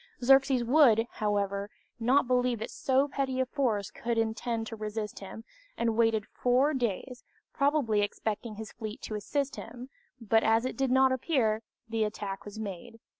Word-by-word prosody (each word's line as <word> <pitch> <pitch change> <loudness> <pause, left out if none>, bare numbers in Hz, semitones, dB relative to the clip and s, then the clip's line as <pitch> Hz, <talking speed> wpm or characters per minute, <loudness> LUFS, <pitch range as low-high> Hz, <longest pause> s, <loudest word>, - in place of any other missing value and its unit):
Xerxes 270 -1 +5
would, 235 -3 +5
however, 200 -1 -1 0.3
not 255 +4 +3
believe 250 -1 +2
that 220 - -6
so 270 +1 +1
petty 270 -2 -2
a 260 - +2
force 225 -7 -1
could 235 +2 -3
intend 225 0 -1
to 225 - -6
resist 215 0 -5
him, 200 +3 -9 0.3
and 230 -1 0
waited 225 -2 +2
four 255 +5 +2
days, 245 0 -3 0.3
probably 275 -7 +2
expecting 215 +2 -3
his 220 0 -8
fleet 215 -2 -7
to - - -5
assist 275 +7 -2
him, 245 +2 -9 0.3
but 225 -1 +2
as 225 +2 +3
it 255 - -3
did 270 -1 0
not 265 +1 +4
appear, 245 -5 +1 0.3
the 225 -1 0
attack 205 -2 -4
was 205 0 -9
made. 220 +2 -7
230 Hz, 165 wpm, -29 LUFS, 215-260 Hz, 0.3 s, Xerxes